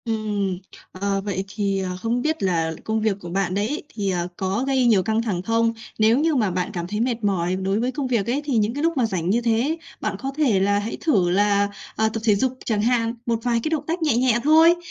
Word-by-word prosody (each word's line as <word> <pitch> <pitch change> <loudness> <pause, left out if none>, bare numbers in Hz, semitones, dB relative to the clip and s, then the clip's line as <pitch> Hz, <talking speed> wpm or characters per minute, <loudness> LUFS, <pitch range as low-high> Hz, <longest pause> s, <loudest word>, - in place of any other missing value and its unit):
Ừm, 210 -4 -1 0.3
ờ, 195 +1 -1
vậy 195 -1 -3
thì 200 -2 0
ờ 185 -1 -3
không 235 +2 0
biết 315 0 -1
là 165 -3 +1
công 220 0 -1
việc 215 -3 +1
của 175 - -7
bạn 185 0 -1
đấy 205 +2 0
ấy 300 +5 -4
thì, 200 -3 -1
ờ, 175 -1 -1
có 195 +4 -1
gây 265 -2 +2
nhiều 210 -6 +4
căng 220 +3 +1
thẳng 200 -7 -2
không? 230 +3 +1 0.3
Nếu 220 +4 +4
như 315 0 +2
mà 215 -7 +1
bạn 180 0 -2
cảm 175 -1 -4
thấy 210 +3 -3
mệt 235 -1 -1
mỏi 185 -3 +1
đối 190 +2 -1
với 245 +2 0
công 270 0 -3
việc 235 -5 0
ấy, 260 +5 0
thì 275 -5 0
những 215 +1 +1
cái 290 +3 -3
lúc 330 -2 +1
mà 250 - +3
rảnh 185 -5 -2
như 230 +5 +2
thế. 240 +7 +1 0.2
Bạn - - -2
có 270 - -3
thể 255 -11 +3
là 200 +1 +2
hãy 210 +2 -4
thử 200 - +2
là, 200 +2 +2 0.3
ờ, 220 0 +2
tập 225 - -3
thể 215 -3 +4
dục 260 +4 -1
chẳng 215 -3 0
hạn, 230 0 +1
một 230 -1 0
vài 235 -1 +1
cái - - -1
động 310 -2 -1
tác 335 +2 -2
nhẹ 300 -7 +2
nhẹ 245 -2 +3
thôi, 320 +3 +6
220 Hz, 260 wpm, -23 LUFS, 195-245 Hz, 0.3 s, thôi